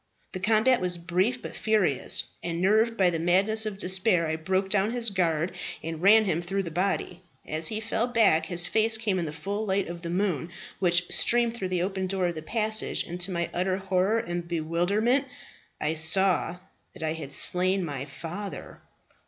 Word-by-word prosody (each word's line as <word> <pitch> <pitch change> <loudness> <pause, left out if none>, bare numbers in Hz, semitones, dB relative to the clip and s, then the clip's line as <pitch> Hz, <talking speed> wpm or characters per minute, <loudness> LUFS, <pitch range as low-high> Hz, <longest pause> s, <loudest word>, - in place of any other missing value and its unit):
The 185 - -5
combat 220 +5 +3
was 180 -1 0
brief 185 +8 -1
but - - -8
furious, 210 - 0 0.2
and 170 -1 -4
nerved 220 +5 +2
by 185 -2 +3
the 165 - -2
madness 200 +6 +1
of 205 -2 -5
despair 185 -2 +2
I 160 0 -2
broke 185 +4 -1
down 205 +3 +1
his 235 -3 +1
guard 170 -3 0 0.3
and 165 0 -5
ran 215 +3 +6
him 170 -3 -1
through 195 +3 -2
the 170 - -6
body. 180 0 -2 0.2
As 155 +1 +1
he 215 - -2
fell 225 +2 -1
back, 225 -9 +3
his 175 -1 +3
face 220 +3 +2
came 210 -4 -1
in 170 - -2
the 150 - -4
full 200 +7 -4
light 195 -2 -1
of 170 0 -7
the 170 - -6
moon, 180 -2 -1 0.3
which 175 -1 +2
streamed 235 -1 +3
through 195 -6 -4
the 180 -1 -1
open 190 0 -2
door 190 -1 -1
of - - -4
the 155 - -7
passage, 215 +5 0
and 175 +1 -7
to 180 - +1
my 170 -2 -3
utter 185 +1 -1
horror 190 +3 0
and 175 -5 -4
bewilderment 175 - 0 0.5
I 150 - -1
saw 175 +2 +3 0.4
that - - -9
I 155 0 -1
had 155 -4 -8
slain 185 +5 +3
my 140 -4 -5
father. 170 +8 -8
185 Hz, 195 wpm, -26 LUFS, 170-210 Hz, 0.5 s, ran